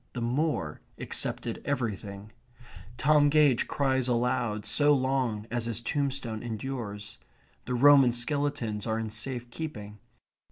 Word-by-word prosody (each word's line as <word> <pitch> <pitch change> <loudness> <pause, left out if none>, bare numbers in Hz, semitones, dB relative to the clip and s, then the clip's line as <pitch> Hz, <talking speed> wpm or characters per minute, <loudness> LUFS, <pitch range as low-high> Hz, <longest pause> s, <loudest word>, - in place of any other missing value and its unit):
The 125 - -4
moor 120 - -1 0.2
accepted - - -2
everything. 105 -6 -4 0.7
Tom 145 +2 +4
Gage 145 -4 +4
cries 130 -2 +1
aloud 120 -3 0
so 145 +7 +4
long 130 -5 -1
as 120 -1 -1
his 115 -2 0
tombstone 130 -4 -2
endures. 110 -3 -5 0.5
The 125 - -2
Roman 135 0 +7
skeletons 120 -4 -1
are 110 0 0
in 110 -1 -4
safe 120 +2 -4
keeping. 105 -10 -7
120 Hz, 120 wpm, -28 LUFS, 110-140 Hz, 0.7 s, Roman